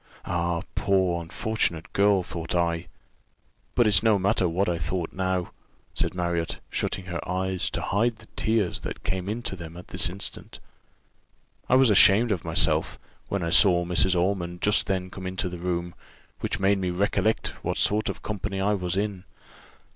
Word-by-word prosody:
Ah! 85 Hz, -1 st, -1 dB
poor 95 Hz, -3 st, +1 dB
unfortunate 85 Hz, -1 st, -2 dB
girl, 100 Hz, -2 st, +4 dB
thought 85 Hz, 0 st, -5 dB
I 85 Hz, 0 st, 0 dB, 0.9 s
but 120 Hz, -, +4 dB
it's 100 Hz, -3 st, +5 dB
no 110 Hz, -2 st, +4 dB
matter 95 Hz, -1 st, +2 dB
what 95 Hz, +4 st, 0 dB
I 85 Hz, -2 st, 0 dB
thought 80 Hz, +3 st, -3 dB
now," 95 Hz, -1 st, -1 dB, 0.4 s
said -, -, -1 dB
Marriott, 85 Hz, -2 st, -1 dB
shutting 95 Hz, -, -2 dB
her 90 Hz, -2 st, -4 dB
eyes, 95 Hz, 0 st, 0 dB
to -, -, -3 dB
hide 115 Hz, +5 st, +1 dB
the 110 Hz, -, -17 dB
tears 110 Hz, -5 st, 0 dB
that -, -, -6 dB
came 95 Hz, +1 st, -2 dB
into 110 Hz, -2 st, -3 dB
them 85 Hz, -2 st, -9 dB
at 90 Hz, -, -11 dB
this 95 Hz, +3 st, 0 dB
instant; 95 Hz, +3 st, -7 dB, 1.1 s
"I 125 Hz, -, +5 dB
was 130 Hz, -3 st, +6 dB
ashamed 105 Hz, +3 st, +6 dB
of 95 Hz, -5 st, -1 dB
myself, -, -, +1 dB, 0.3 s
when 100 Hz, -3 st, -2 dB
I 85 Hz, -, -1 dB
saw 90 Hz, -2 st, +5 dB
Mrs. 90 Hz, +1 st, +2 dB
Ormond 90 Hz, -1 st, -1 dB
just 105 Hz, -, +2 dB
then 95 Hz, -2 st, -2 dB
come 95 Hz, -1 st, -6 dB
into 95 Hz, 0 st, -2 dB
the 90 Hz, -1 st, -7 dB
room, 85 Hz, 0 st, -2 dB, 0.5 s
which -, -, -2 dB
made 100 Hz, +1 st, +3 dB
me 90 Hz, -1 st, -1 dB
recollect 100 Hz, +4 st, +1 dB
what -, -, -1 dB
sort 105 Hz, +1 st, +2 dB
of -, -, -6 dB
company 100 Hz, -2 st, -3 dB
I 100 Hz, +2 st, +2 dB
was 90 Hz, -2 st, -2 dB
in. 100 Hz, -3 st, -2 dB
95 Hz, 170 wpm, -26 LUFS, 85-100 Hz, 1.1 s, was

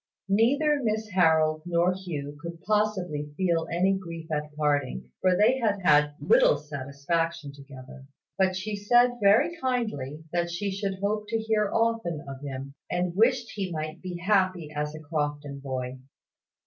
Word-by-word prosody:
Neither 280 Hz, +9 st, +3 dB
Miss 220 Hz, -2 st, -1 dB
Harold 160 Hz, -4 st, +3 dB
nor 175 Hz, +1 st, +2 dB
Hugh 155 Hz, -6 st, -6 dB
could 170 Hz, 0 st, -7 dB
possibly 185 Hz, -9 st, -1 dB
feel 170 Hz, -3 st, +1 dB
any 185 Hz, +3 st, +2 dB
grief 165 Hz, -4 st, -6 dB
at 150 Hz, 0 st, -2 dB
parting; 145 Hz, -, -1 dB
for 185 Hz, -1 st, +3 dB
they 250 Hz, +5 st, +4 dB
had 210 Hz, -4 st, +1 dB
had 150 Hz, -2 st, +4 dB
little -, -, +4 dB
satisfaction 145 Hz, +2 st, -3 dB
together; 135 Hz, -1 st, -12 dB, 0.3 s
but 190 Hz, -1 st, +2 dB
she 205 Hz, +3 st, -3 dB
said 240 Hz, +4 st, +3 dB
very 210 Hz, +12 st, +4 dB
kindly 215 Hz, -, -2 dB
that 170 Hz, 0 st, 0 dB
she 195 Hz, +4 st, -2 dB
should 195 Hz, 0 st, -2 dB
hope 210 Hz, +1 st, -1 dB
to 225 Hz, +1 st, 0 dB
hear 220 Hz, -2 st, +1 dB
often 225 Hz, -9 st, 0 dB
of 135 Hz, -1 st, -8 dB
him, 135 Hz, -1 st, -6 dB, 0.2 s
and 180 Hz, 0 st, -1 dB
wished 235 Hz, +3 st, +2 dB
he 195 Hz, -3 st, -4 dB
might 155 Hz, +1 st, -5 dB
be 180 Hz, -2 st, -5 dB
happy 185 Hz, -4 st, +1 dB
as 150 Hz, +1 st, -2 dB
a -, -, -7 dB
Crofton 145 Hz, -2 st, -3 dB
boy. 130 Hz, -1 st, -4 dB
175 Hz, 155 wpm, -27 LUFS, 150-210 Hz, 0.3 s, they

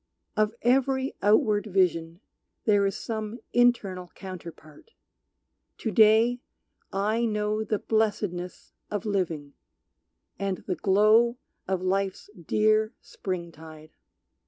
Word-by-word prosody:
Of 215 Hz, +1 st, +1 dB
every 265 Hz, +2 st, +2 dB
outward 210 Hz, +1 st, +3 dB
vision 175 Hz, -3 st, 0 dB, 0.4 s
there 205 Hz, -2 st, +4 dB
is 195 Hz, -, -3 dB
some 220 Hz, +1 st, -5 dB
Internal 205 Hz, -7 st, +2 dB
counterpart. 175 Hz, -, -11 dB, 0.8 s
To 220 Hz, -, -3 dB
day 220 Hz, +4 st, +5 dB, 0.5 s
I 215 Hz, +4 st, 0 dB
know 210 Hz, 0 st, -1 dB
The 215 Hz, 0 st, -1 dB
blessedness 205 Hz, -5 st, -2 dB, 0.2 s
of 205 Hz, -1 st, -3 dB
living, 165 Hz, -8 st, -2 dB, 0.9 s
and 195 Hz, -2 st, -2 dB
the 185 Hz, -, -1 dB
glow 215 Hz, +7 st, +4 dB, 0.3 s
Of 185 Hz, -1 st, -1 dB
life's 195 Hz, +2 st, -1 dB
dear 215 Hz, +5 st, +1 dB
spring 175 Hz, -3 st, -5 dB
tide. 155 Hz, -1 st, -13 dB
205 Hz, 105 wpm, -27 LUFS, 185-220 Hz, 0.9 s, day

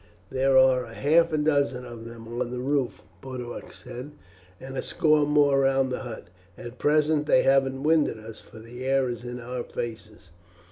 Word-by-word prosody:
"There 135 Hz, 0 st, +3 dB
are 130 Hz, -2 st, +4 dB
half 160 Hz, +8 st, +2 dB
a 155 Hz, -, +1 dB
dozen 140 Hz, -4 st, +1 dB
of 120 Hz, -2 st, -9 dB
them 115 Hz, -1 st, -10 dB
on 120 Hz, +1 st, -3 dB
the 125 Hz, -, -5 dB
roof," 135 Hz, 0 st, -1 dB, 0.2 s
Boduoc 125 Hz, -2 st, -7 dB
said, 125 Hz, +4 st, -9 dB, 0.5 s
"and 135 Hz, +1 st, -8 dB
a -, -, -1 dB
score 155 Hz, -1 st, +2 dB
or 145 Hz, -, +3 dB
more 145 Hz, -2 st, +4 dB
round 135 Hz, -1 st, +2 dB
the -, -, -2 dB
hut. 120 Hz, -8 st, -8 dB, 0.3 s
At 120 Hz, +1 st, -10 dB
present 150 Hz, 0 st, +2 dB
they 130 Hz, -, +4 dB
haven't 135 Hz, 0 st, +2 dB
winded 155 Hz, -5 st, +2 dB
us, 110 Hz, 0 st, -11 dB
for -, -, -16 dB
the 120 Hz, +3 st, -9 dB
air 135 Hz, -1 st, +1 dB
is 120 Hz, 0 st, -5 dB
in 125 Hz, 0 st, -6 dB
our 125 Hz, +1 st, -5 dB
faces." 110 Hz, -5 st, -7 dB
130 Hz, 185 wpm, -26 LUFS, 120-140 Hz, 0.5 s, are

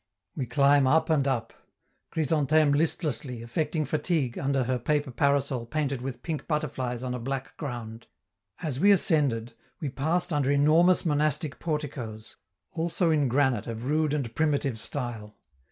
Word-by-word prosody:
We 130 Hz, -, -3 dB
climb 140 Hz, +1 st, +4 dB
up 160 Hz, +3 st, +3 dB
and 140 Hz, -3 st, +2 dB
up 120 Hz, -4 st, -1 dB, 0.6 s
Chrysantheme 155 Hz, -1 st, +2 dB
listlessly, 145 Hz, -6 st, -1 dB
affecting 155 Hz, +6 st, -1 dB
fatigue, 155 Hz, -6 st, -1 dB
under 135 Hz, -1 st, 0 dB
her 125 Hz, +1 st, -1 dB
paper 145 Hz, +2 st, 0 dB
parasol 140 Hz, -2 st, +1 dB
painted 140 Hz, -3 st, -2 dB
with 125 Hz, -2 st, -6 dB
pink 160 Hz, -3 st, -4 dB
butterflies 130 Hz, -6 st, -2 dB
on 125 Hz, -1 st, -3 dB
a 125 Hz, -, -3 dB
black 135 Hz, +2 st, -4 dB
ground. 120 Hz, -5 st, -6 dB, 0.6 s
As 140 Hz, -5 st, -2 dB
we 200 Hz, -, +5 dB
ascended, 140 Hz, -, +3 dB, 0.3 s
we 150 Hz, -, -3 dB
passed 165 Hz, +6 st, -1 dB
under 145 Hz, -2 st, +1 dB
enormous 155 Hz, +6 st, +4 dB
monastic 150 Hz, -1 st, 0 dB
porticoes, 130 Hz, -9 st, -5 dB, 0.4 s
also 170 Hz, +1 st, 0 dB
in 150 Hz, -3 st, +2 dB
granite 130 Hz, -3 st, +1 dB
of 115 Hz, +1 st, -5 dB
rude 150 Hz, +1 st, +1 dB
and 125 Hz, -6 st, -3 dB
primitive 140 Hz, -4 st, 0 dB
style. 115 Hz, -4 st, -4 dB
140 Hz, 145 wpm, -27 LUFS, 125-155 Hz, 0.6 s, we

